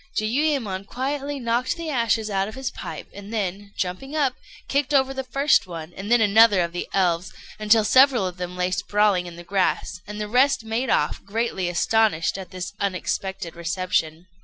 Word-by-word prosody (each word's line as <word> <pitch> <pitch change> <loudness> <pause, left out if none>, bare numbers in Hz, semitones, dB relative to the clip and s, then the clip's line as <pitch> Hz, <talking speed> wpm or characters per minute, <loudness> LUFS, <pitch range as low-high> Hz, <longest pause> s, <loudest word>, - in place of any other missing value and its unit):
Jiuyémon 220 -5 -1
quietly 280 +3 -3
knocked 245 +7 0
the 330 -2 -4
ashes 230 -4 +1
out 195 -2 0
of 220 - -8
his 265 -1 -3
pipe, - - -7
and 200 +1 -10
then, 200 -2 -3
jumping 190 +11 -3
up, 280 -5 +2 0.3
kicked 285 +1 0
over 270 0 +3
first 275 -2 +2
one 165 -1 -8
and 200 +3 -6
then 240 - +6
another 210 -2 +6
of 170 -1 -1
the 175 - -4
elves, 180 -2 +1 0.3
until 215 +1 +4
several 260 -2 +5
of 180 0 -5
them 180 0 -5
lay 180 0 0
sprawling 200 -2 +1
in 170 - -9
the 175 - -10
grass; 185 -1 -1
and 210 +1 -6
the 210 - -3
rest 255 +1 +3
made 230 +3 -1
off, 150 - +1
greatly 200 -3 -2
astonished 175 -1 +2
at 190 - -8
this 185 -1 -6
unexpected 190 -2 -3
reception. 170 -1 -1
210 Hz, 180 wpm, -24 LUFS, 180-250 Hz, 0.3 s, then